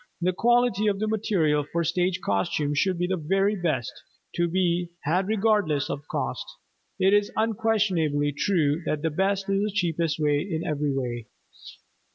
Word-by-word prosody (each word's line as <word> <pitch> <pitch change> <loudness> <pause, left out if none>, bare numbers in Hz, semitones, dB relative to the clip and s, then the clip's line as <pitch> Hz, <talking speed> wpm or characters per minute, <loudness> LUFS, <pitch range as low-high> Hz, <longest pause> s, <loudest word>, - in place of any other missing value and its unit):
The 180 +1 +1
quality 240 -1 +2
of 200 -1 +1
the 215 +2 -1
material 180 -9 +1
for 170 +4 -2
stage 180 +3 0
costumes 145 +9 0
should 190 -2 +1
be 175 - 0
the 185 +1 -1
very 195 +5 +2
best 155 - -1 0.4
to 175 0 +1
be 175 0 0
had 180 +6 +1
regardless 205 -9 +1
of 140 +1 -6
cost. - - -3 0.5
It 190 +1 +3
is 205 0 +3
unquestionably 195 -10 +1
true 155 -1 +1
that 155 0 -1
the 160 - 0
best 195 +4 0
is 195 0 +1
the 210 - 0
cheapest 170 -5 -1
in 155 +3 0
every 150 -1 -1
way. 120 -4 -3
175 Hz, 160 wpm, -26 LUFS, 150-200 Hz, 0.5 s, It